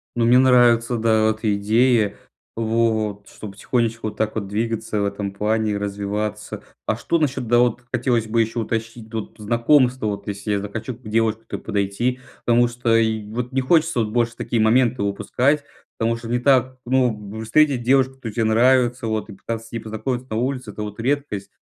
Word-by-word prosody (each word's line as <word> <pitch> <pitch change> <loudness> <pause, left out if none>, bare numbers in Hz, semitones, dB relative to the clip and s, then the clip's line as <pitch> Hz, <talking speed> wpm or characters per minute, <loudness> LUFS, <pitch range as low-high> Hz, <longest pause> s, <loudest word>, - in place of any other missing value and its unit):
Ну, 120 -1 +2
мне 120 +2 +6
нравится, 120 -2 +4
да, 110 -1 +3
вот 110 +1 -2
идеи, 110 +2 +2 0.4
вот 110 -2 0
чтобы 105 -2 -10
потихонечку 115 0 -1
вот - - -12
так 110 0 -1
вот 100 -3 -3
двигаться 110 0 -2
в 100 - +1
этом 100 0 -3
плане 110 +1 0
и 100 - -1
развиваться. 100 +1 -4 0.2
А - - 0
что 170 - 0
насчет, 135 -6 -1
да, 120 +1 +4
вот 120 0 +2
хотелось 120 -2 0
бы 115 +2 0
еще 115 +2 -2
уточнить, 115 0 -4
вот, 110 -1 -5
знакомство, 120 +3 +2
вот 100 -1 -3
если 100 +1 -4
я 100 - +1
захочу 110 +5 -5
к 125 - -23
девушке 110 0 -1
подойти. 105 +6 -1 0.3
Потому 120 0 +4
что 120 -1 0
и 110 -1 +1
вот 125 +2 -4
не 135 - +1
хочется 160 -1 +2
вот 105 - -1
больше 120 0 0
такие 115 -2 -1
моменты 120 +1 +3
упускать, 125 +8 0 0.3
потому 115 +1 +1
что 115 0 -8
не 120 +1 0
так, 130 0 +2
ну, 110 -5 0
встретить 135 +2 +3
девушку, 130 +1 +3
которая 115 -5 -7
тебе 115 - +1
нравится, 120 +1 +3
вот, 110 -1 -2
и - - -8
пытаться 115 +3 -6
с - - -19
ней 115 - -3
познакомиться 110 +4 -4
на 110 - -3
улице- 125 -2 -2
это 105 - -6
вот 105 +1 -7
редкость. 120 -7 -2
115 Hz, 190 wpm, -22 LUFS, 110-125 Hz, 0.4 s, мне